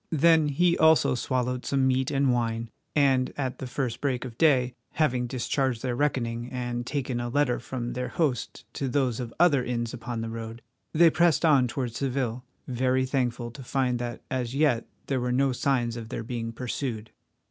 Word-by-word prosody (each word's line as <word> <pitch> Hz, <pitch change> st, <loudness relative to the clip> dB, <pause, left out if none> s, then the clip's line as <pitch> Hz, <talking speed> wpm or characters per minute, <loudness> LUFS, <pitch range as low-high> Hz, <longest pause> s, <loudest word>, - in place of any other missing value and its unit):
Then 160 Hz, 0 st, +4 dB
he 170 Hz, +5 st, +3 dB
also 160 Hz, 0 st, +5 dB
swallowed 125 Hz, 0 st, -1 dB
some 135 Hz, -1 st, +1 dB
meat 130 Hz, 0 st, +2 dB
and 135 Hz, -2 st, +2 dB
wine, 115 Hz, -1 st, -1 dB, 0.2 s
and 135 Hz, -3 st, +3 dB
at 130 Hz, -3 st, -3 dB
the 130 Hz, -, -5 dB
first 125 Hz, -2 st, -3 dB
break 130 Hz, -3 st, -1 dB
of 120 Hz, -3 st, -8 dB
day, 130 Hz, -4 st, +3 dB, 0.2 s
having 125 Hz, -6 st, +1 dB
discharged 130 Hz, 0 st, -1 dB
their 125 Hz, -2 st, -1 dB
reckoning 120 Hz, -4 st, -1 dB
and 120 Hz, -1 st, -3 dB
taken 130 Hz, -4 st, -2 dB
a 120 Hz, 0 st, -3 dB
letter 135 Hz, -1 st, +1 dB
from 120 Hz, -1 st, -4 dB
their 125 Hz, 0 st, -3 dB
host 140 Hz, -8 st, -2 dB
to 135 Hz, -, -2 dB
those 130 Hz, -3 st, 0 dB
of 120 Hz, -2 st, -4 dB
other 155 Hz, -7 st, +5 dB
inns 120 Hz, -2 st, -2 dB
upon 120 Hz, -1 st, -4 dB
the 115 Hz, -, -4 dB
road, 115 Hz, 0 st, -7 dB, 0.3 s
they 165 Hz, +1 st, +6 dB
pressed 170 Hz, 0 st, +3 dB
on 140 Hz, -5 st, +5 dB
towards 120 Hz, -1 st, -3 dB
Seville, 130 Hz, -3 st, -1 dB, 0.2 s
very 130 Hz, +1 st, +1 dB
thankful 125 Hz, -3 st, -1 dB
to 125 Hz, -, -10 dB
find 125 Hz, -1 st, 0 dB
that 120 Hz, -1 st, -5 dB
as 130 Hz, -1 st, -2 dB
yet 140 Hz, -6 st, +2 dB, 0.2 s
there 135 Hz, -2 st, -1 dB
were 125 Hz, 0 st, -1 dB
no 135 Hz, +2 st, +2 dB
signs 125 Hz, -2 st, 0 dB
of 115 Hz, -2 st, -7 dB
their 120 Hz, -, -4 dB
being 115 Hz, -1 st, -4 dB
pursued. 115 Hz, -2 st, -4 dB
125 Hz, 185 wpm, -27 LUFS, 120-140 Hz, 0.3 s, they